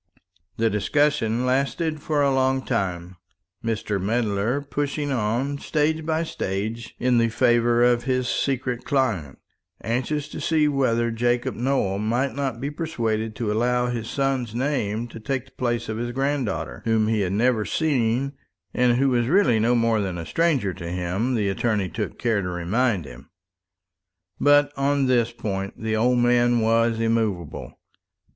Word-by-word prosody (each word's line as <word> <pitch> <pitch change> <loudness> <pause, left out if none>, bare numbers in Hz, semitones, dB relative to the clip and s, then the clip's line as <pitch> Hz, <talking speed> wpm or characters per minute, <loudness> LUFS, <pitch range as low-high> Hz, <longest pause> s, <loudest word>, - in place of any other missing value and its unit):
The 115 - +2
discussion 120 +2 +1
lasted 145 +4 0
for 150 -1 +1
a 140 -1 +3
long 130 0 +1
time; 90 -6 -2 0.5
Mr. 110 -3 -2
Medler 110 +3 0
pushing 145 0 -3
on, 130 +4 -1
stage 155 +1 0
by 160 0 +1
stage, 110 - -4
in 125 -1 +2
the 115 0 +2
favour 120 0 +3
of 120 -1 +3
his 130 -1 0
secret 130 -2 -1
client, 110 - -1 0.5
anxious 130 +6 -1
to - - -7
see 155 -2 +2
whether 120 -5 +1
Jacob 120 +1 0
Nowell 120 -6 0
might 120 +6 0
not 135 -4 -3
be 140 +3 -3
persuaded 115 -9 -2
to 110 -3 -2
allow 125 +3 +1
his 115 -2 -4
son's 135 -5 -1
name 120 -4 -1
to 115 - -9
take 130 +3 -3
the 135 - -22
place 120 -2 -2
of 110 - -3
his 120 +1 -3
granddaughter, 125 - -2
whom 110 -1 +2
he 110 -1 +1
had 95 -1 -1
never 115 +1 +2
seen, 135 -2 0 0.4
and 120 -1 +3
who 135 +1 +3
was 120 -2 +1
really 135 - +4
no 120 +3 +3
more 115 -2 +2
than 95 -3 -3
a 85 - -5
stranger 145 - +1
to 85 -2 -7
him, 90 +8 -1
the 105 -3 0
attorney 100 -1 0
took 105 -2 -4
care 115 -4 +1
to 90 - -3
remind 90 - 0
him. 70 0 -12 1.1
But 145 0 +4
on 140 0 +1
this 120 -3 +2
point 100 -4 -4
the 110 0 -1
old 125 +3 +2
man 120 0 +3
was 115 0 +2
immovable. 110 -8 -1
120 Hz, 160 wpm, -24 LUFS, 110-135 Hz, 1.1 s, really